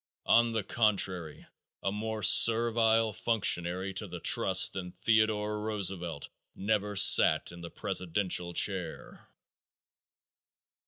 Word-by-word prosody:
On 115 0 +2
the 110 -2 -3
contrary, 95 -8 -2 0.4
a 95 - -2
more 110 +1 -6
servile 115 +1 +3
functionary 95 -4 -1
to 100 +3 -5
the 90 -1 -9
trusts - - +3
than 90 -2 -8
Theodore 105 +1 -1
Roosevelt 95 -7 -5 0.3
never 105 0 -3
sat 80 -5 +4
in 85 0 -13
the 85 - -9
presidential 90 0 -3
chair. 95 -5 -2
100 Hz, 105 wpm, -28 LUFS, 90-110 Hz, 0.4 s, sat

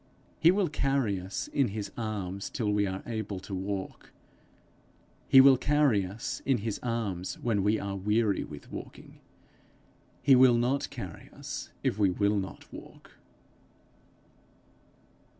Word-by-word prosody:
He 165 - +6
will 190 +1 +3
carry 135 - 0
us 95 +2 -5
in 140 -3 +1
his 105 0 -5
arms 100 -4 -4
till 110 -5 -1
we 105 -1 +2
are 95 0 -5
able 110 -4 -4
to 100 - -8
walk; 95 0 -5 1.2
he 135 - +8
will 135 0 +8
carry 135 -8 +2
us 105 +5 -5
in 135 -2 +2
his 110 -1 -3
arms 105 -7 -3
when 110 -4 0
we 105 +2 +2
are 100 -1 -4
weary 105 +1 +1
with 75 -2 -11
walking; - - -10 1.0
he 135 -2 +7
will 125 -1 +6
not 125 +4 0
carry 100 - -8
us - - -7
if 100 - 0
we 100 -2 +4
will 100 +3 +1
not 95 -1 -8
walk. - - -12
105 Hz, 140 wpm, -29 LUFS, 100-125 Hz, 1.2 s, he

